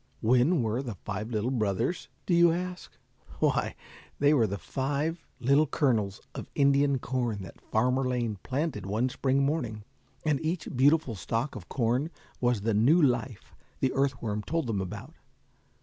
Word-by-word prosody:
When 125 +6 +3
were 115 +3 0
the 120 -6 -5
five 105 +4 -5
little 115 +2 -1
brothers, 115 - -1 0.2
do 180 - +1
you 170 0 +6
ask? 180 +1 -5 0.4
Why, - - +1 0.4
they 145 +1 +4
were 120 -7 +4
five 140 - -2 0.2
little 140 +5 +4
kernels 110 -9 +1
of - - -7
Indian 140 -1 +4
corn 120 -6 -2
that 85 - -12
Farmer 125 +4 +1
Lane 120 -5 -1
planted 130 - -2
one 110 +6 +1
spring 135 +2 +1
morning, 120 -8 -2 0.4
and 150 -2 +1
each 160 +1 -2
beautiful 140 0 +4
stalk 115 - -2
of 100 -5 -9
corn 125 +4 0 0.3
was 120 -4 +1
the 110 +2 0
new 125 +12 +5
life 125 - 0 0.3
the 130 - +1
earth 135 -1 +1
worm 105 -2 -1
told 165 +6 -1
them 110 -5 -1
about. 95 - -7
125 Hz, 155 wpm, -29 LUFS, 110-145 Hz, 0.4 s, you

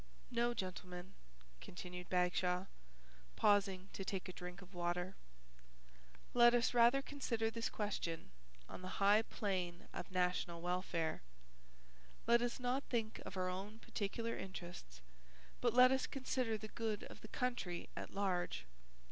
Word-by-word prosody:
"No, 240 0 +2
gentlemen," 185 -1 -5 0.5
continued 180 - -7
Bagshaw, 180 0 +2 0.7
pausing 195 -2 +3
to 195 - -4
take 190 -1 -2
a 185 - -6
drink 180 +1 -7
of 185 +2 -16
water, 175 +1 -1 1.2
"let 240 0 +8
us 240 +1 +3
rather 240 +3 +6
consider 230 -6 -1
this 230 0 -1
question 170 - -2 0.4
on - - -8
the 185 0 -5
high 205 +2 +6
plane 185 -6 -2
of - - -5
national 180 -2 +1
welfare. 175 -2 -1 1.0
Let 235 +1 +6
us 245 +2 -1
not 250 +2 +1
think 225 -3 -1
of 195 - -6
our 185 0 +1
own 195 +4 -4
particular 230 +1 -2
interests 175 - -7 0.6
but - - +2
let 255 +1 +9
us 265 0 +2
consider 255 -4 0
the 215 0 -7
good 220 -3 -2
of - - -10
the - - -8
country 210 -8 -2
at - - -5
large. 180 - -1
195 Hz, 140 wpm, -39 LUFS, 180-230 Hz, 1.2 s, let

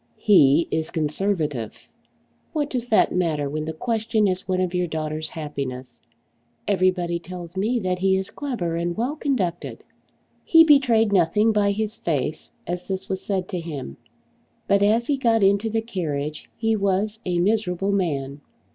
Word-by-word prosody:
"He 165 -6 +5
is 160 0 -1
Conservative!" 155 - -2 0.7
"What 295 -2 -1
does 245 -2 -3
that 220 - +3
matter 160 -5 0
when 155 +2 -3
the 160 - -3
question 220 +3 0
is 185 0 -2
one 185 -1 0
of 185 -1 -1
your 180 0 0
daughter's 155 -1 -3
happiness? 135 -5 -6 0.7
Everybody 185 -3 +1
tells 175 0 -9
me 215 +6 0
that 185 -1 -1
he 190 0 +3
is 190 0 -4
clever 225 - -3
and 170 +2 -2
well 250 +6 -1
conducted." 220 - -2 0.6
He 325 -1 +7
betrayed 245 -9 +4
nothing 210 +5 +3
by 205 -1 +2
his 215 +2 -2
face 150 -3 -2
as 180 +1 -4
this 190 0 -4
was 190 -1 -2
said 190 -3 -2
to 180 - -3
him. 150 - -7 0.7
But 200 0 +3
as 220 +4 +3
he 285 +1 0
got 230 -5 +2
into 200 +3 +3
the 225 +1 0
carriage 155 -9 -4
he 225 -1 +1
was 200 +2 0
a 180 -2 -1
miserable 195 0 +1
man. 145 -7 -2
185 Hz, 160 wpm, -23 LUFS, 160-215 Hz, 0.7 s, He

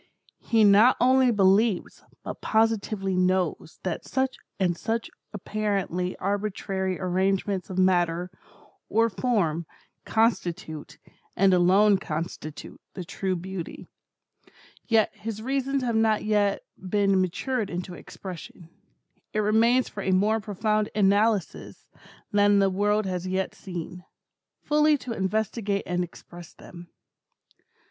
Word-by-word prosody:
He 225 -2 +2
not 210 +5 +6
only 260 +1 +4
believes, 205 -1 +2 0.2
but - - -7
positively 215 -3 0
knows, 185 -3 0
that 180 -3 -3
such 265 0 -1 0.2
and 180 -3 +1
such 225 +6 -3 0.2
apparently 200 -3 -2
arbitrary 195 -2 -2
arrangements 190 +1 0
of 185 - -6
matter, 180 -1 +2 0.6
or 225 +1 +2
form, 175 -8 0 0.4
constitute, 180 -9 -1 0.4
and 195 0 +4
alone 190 +3 +4
constitute, 155 -1 -6
the 185 - -5
true 190 +1 -3
Beauty. 180 0 -6 1.0
Yet 225 -2 +3
his 220 -1 -6
reasons 270 +2 -1
have 235 -2 0
not 220 -1 +2
yet 205 -2 +1 0.2
been 195 0 +1
matured 210 +5 -2
into 180 +1 -5
expression. 175 -2 -10 0.6
It 215 - +1
remains 230 +4 +3
for 205 - -7
a 190 - -2
more 205 +4 +3
profound 215 +1 -1
analysis 205 -1 0 0.4
than 205 -1 +4
the 195 -1 +3
world 205 +2 +1
has 185 -1 -3
yet 190 +1 -1
seen, 180 -1 -7 0.6
fully 300 0 +3
to 255 -3 -7
investigate 205 0 -1
and 180 0 -1
express 175 0 -11
them. 175 -1 -12
200 Hz, 115 wpm, -26 LUFS, 185-220 Hz, 1.0 s, not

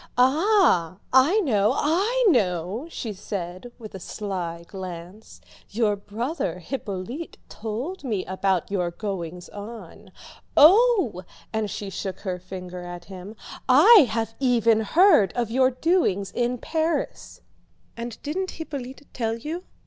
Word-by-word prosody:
"Ah, 265 - +3 0.2
I 295 +12 +5
know, 215 - +2
I 405 +11 +1
know," 200 - 0
she 225 -9 -5
said 185 +2 -6
with 215 -2 -10
a 190 - -7
sly 175 -4 -5
glance, 185 +2 -9 0.3
"your 215 -1 +1
brother 210 - -4
Hippolyte 220 - -6
told 235 - -5
me 215 -8 -2
about 190 -1 -1
your 180 -3 0
goings 180 -2 -5
on. 215 +3 -10 0.5
Oh!" 380 - +6 0.3
and 220 -1 -1
she 200 0 -5
shook 190 -1 -5
her 185 -3 -3
finger 180 0 -8
at 175 0 -8
him, 190 +2 -9 0.3
"I 320 - +8
have 225 0 -2
even 230 -4 +3
heard 220 - +4
of 240 -3 -2
your 255 +1 +4
doings 255 - +1
in 245 +1 -1
Paris!" 320 +6 -2 0.5
"And 235 -1 -6
didn't 370 +6 -2
Hippolyte 285 -3 -7
tell 225 -2 -2
you?" 320 +9 -6
220 Hz, 125 wpm, -24 LUFS, 190-285 Hz, 0.5 s, I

